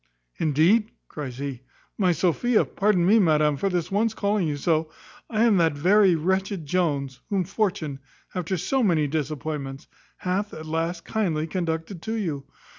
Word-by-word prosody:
"Indeed," 165 +9 +3 0.2
cries 135 -5 -6
he, 135 -3 -5 0.3
"my 185 -4 +2
Sophia, 190 +7 +2
pardon 195 -4 +1
me, 215 +5 +5
madam, 150 -5 +3
for 195 +8 -1
this 175 -2 -2
once 220 +3 +1
calling 200 -3 +1
you 145 -1 -2
so, 160 +1 +1 0.4
I 220 -1 +1
am 225 -4 +4
that 165 -3 +3
very 185 +5 +4
wretched 190 +1 -1
Jones, 140 -5 -1
whom 195 -3 +1
fortune, 180 -7 -2 0.3
after 180 0 -2
so 260 +10 0
many 170 -9 +3
disappointments, 145 -2 -4 0.3
hath, 195 +3 -2
at 155 - -8
last, 165 +2 -2
kindly 170 -8 0
conducted 165 +1 -3
to 220 +5 -3
you. 160 -11 -3
170 Hz, 155 wpm, -25 LUFS, 155-200 Hz, 0.4 s, me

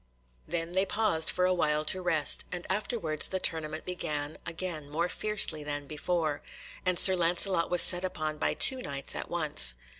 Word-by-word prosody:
Then 165 0 -3
they 190 +2 +2
paused 195 -6 +1
for 180 - +1
a 185 - +2
while 150 -3 0
to 185 +4 +1
rest, 160 -5 +1
and 175 -1 -6
afterwards 190 -6 -1
the 190 - -3
tournament 155 -2 -2
began 150 -4 -4
again 165 -3 -6
more 165 +4 -1
fiercely 190 -6 -1
than 145 -1 -4
before, 155 0 -2 0.4
and 185 -1 0
Sir 190 +1 +7
Lancelot 175 0 +1
was 180 - +5
set 180 0 +7
upon 155 -4 -4
by - - 0
two 260 -1 +2
Knights 140 - -2
at - - -6
once. 150 - +4
170 Hz, 175 wpm, -29 LUFS, 155-185 Hz, 0.4 s, Sir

